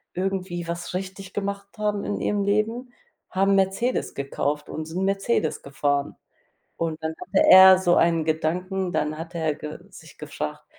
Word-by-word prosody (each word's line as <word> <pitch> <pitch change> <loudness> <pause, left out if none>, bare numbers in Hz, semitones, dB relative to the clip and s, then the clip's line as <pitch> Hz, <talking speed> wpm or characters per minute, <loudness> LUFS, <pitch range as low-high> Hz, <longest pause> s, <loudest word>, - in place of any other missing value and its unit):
irgendwie 185 -2 -3
was 170 +1 -5
richtig 190 +1 -6
gemacht 200 0 -3
haben 210 -1 -1
in 205 - -2
ihrem 205 -1 0
Leben, 220 +5 -1 0.4
haben 195 +1 +2
Mercedes 195 +6 0
gekauft, 145 +1 -2
und 155 - -5
sind 175 +4 -3
Mercedes 195 -4 0
gefahren. 140 0 -1 0.6
Und 160 -1 -3
dann 160 0 -2
hatte 190 - +2
er 190 0 +10
so 175 -2 +2
einen 165 -1 +3
Gedanken, 180 +4 -1
dann 150 -1 -1
hatte 165 +1 -7
er 160 -2 0
ge 150 +1 -7
sich - - -15
gefragt: 75 0 -6
185 Hz, 155 wpm, -24 LUFS, 160-195 Hz, 0.6 s, er